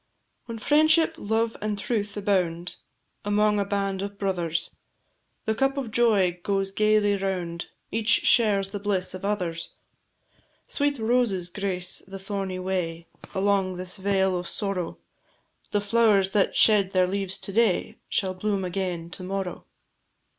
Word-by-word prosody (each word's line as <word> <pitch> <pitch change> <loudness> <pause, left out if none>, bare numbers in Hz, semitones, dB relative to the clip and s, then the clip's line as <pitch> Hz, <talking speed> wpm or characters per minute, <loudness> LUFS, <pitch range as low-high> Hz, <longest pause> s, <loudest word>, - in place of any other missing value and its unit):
When 230 -1 -5
"Friendship, 310 +6 +4
Love, 225 +2 0
and 210 -1 -2
Truth" 205 -1 -2
abound 180 -4 0 0.5
Among 210 0 +2
a 200 - +1
band 195 -1 -1
of 200 0 -5
brothers, 175 -4 -2 0.7
The 220 - +1
cup 270 +4 +1
of 255 -5 -3
joy 200 -7 +3
goes 195 0 -1
gaily 215 0 +3
round, 180 -3 -3 0.2
Each 225 0 0
shares 205 -6 +4
the 205 - -4
bliss 195 -3 -1
of 185 - -8
others. 180 -5 -2 1.0
Sweet 285 -1 0
roses 220 -6 +1
grace 185 -2 -3
the 195 0 -7
thorny 195 -1 -4
way 180 -3 -3 0.3
Along 195 -1 +1
this 185 0 -4
vale 190 -1 +1
of 175 - -6
sorrow; 195 -5 -2 0.7
The 205 - 0
flowers 205 -2 +3
that 200 -1 +2
shed 200 -3 +5
their 185 -1 +4
leaves 195 0 -2
to - - -5
day 220 -4 +2
Shall 190 -2 +1
bloom 195 0 -1
again 180 -2 -3
to 185 - -6
morrow. 190 -1 -4
195 Hz, 140 wpm, -26 LUFS, 185-210 Hz, 1.0 s, shed